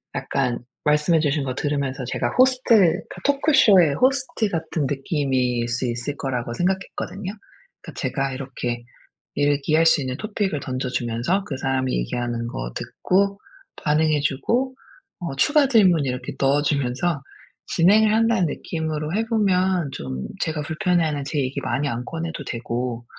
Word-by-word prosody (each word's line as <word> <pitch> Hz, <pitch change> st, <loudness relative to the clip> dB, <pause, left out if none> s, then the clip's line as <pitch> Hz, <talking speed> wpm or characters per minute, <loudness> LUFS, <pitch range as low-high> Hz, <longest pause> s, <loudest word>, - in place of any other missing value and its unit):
약간 125 Hz, -3 st, -1 dB, 0.3 s
말씀해 150 Hz, +2 st, +3 dB
주신 150 Hz, -1 st, +1 dB
거 130 Hz, -1 st, -2 dB
들으면서 140 Hz, -2 st, -2 dB
제가 120 Hz, -, -1 dB
호스트 230 Hz, -9 st, +4 dB, 0.2 s
토크쇼의 235 Hz, -, +5 dB
호스트 250 Hz, -, +1 dB
같은 160 Hz, -3 st, -2 dB
느낌일 130 Hz, -4 st, 0 dB
수 120 Hz, +2 st, -1 dB
있을 120 Hz, +4 st, -3 dB
거라고 125 Hz, -3 st, -3 dB
생각했거든요. 190 Hz, +3 st, -2 dB, 0.5 s
그러니까 -, -, -10 dB
제가 135 Hz, -1 st, -1 dB
이렇게 125 Hz, -3 st, -4 dB, 0.5 s
이야기할 145 Hz, +3 st, +2 dB
수 160 Hz, -2 st, +5 dB
있는 130 Hz, -1 st, -3 dB
토픽을 205 Hz, -6 st, -2 dB
던져 130 Hz, -1 st, -3 dB
주면서 120 Hz, -, -1 dB
그 135 Hz, -, -4 dB
사람이 130 Hz, -1 st, -1 dB
얘기하는 120 Hz, -, -3 dB
거 -, -, -5 dB
듣고 200 Hz, +2 st, 0 dB, 0.4 s
반응해 155 Hz, 0 st, +2 dB
주고 235 Hz, -, 0 dB, 0.5 s
어 170 Hz, -7 st, -4 dB
추가 290 Hz, -, +4 dB
질문 185 Hz, -, +4 dB
이렇게 125 Hz, -1 st, -4 dB
넣어 140 Hz, +2 st, +3 dB
주면서 145 Hz, +2 st, 0 dB, 0.5 s
진행을 210 Hz, +5 st, +4 dB
한다는 225 Hz, -4 st, +3 dB
느낌으로 155 Hz, 0 st, -3 dB
해 220 Hz, +3 st, 0 dB
보면 190 Hz, -, +1 dB
좀 65 Hz, -, -5 dB, 0.2 s
제가 155 Hz, -3 st, -1 dB
불편해하는 160 Hz, -2 st, 0 dB
제 145 Hz, +1 st, -2 dB
얘기 135 Hz, +1 st, -1 dB
많이 130 Hz, +3 st, -1 dB
안 120 Hz, 0 st, -3 dB
꺼내도 165 Hz, +2 st, -5 dB
되고 120 Hz, 0 st, -4 dB
150 Hz, 325 characters per minute, -23 LUFS, 130-185 Hz, 0.5 s, 토크쇼의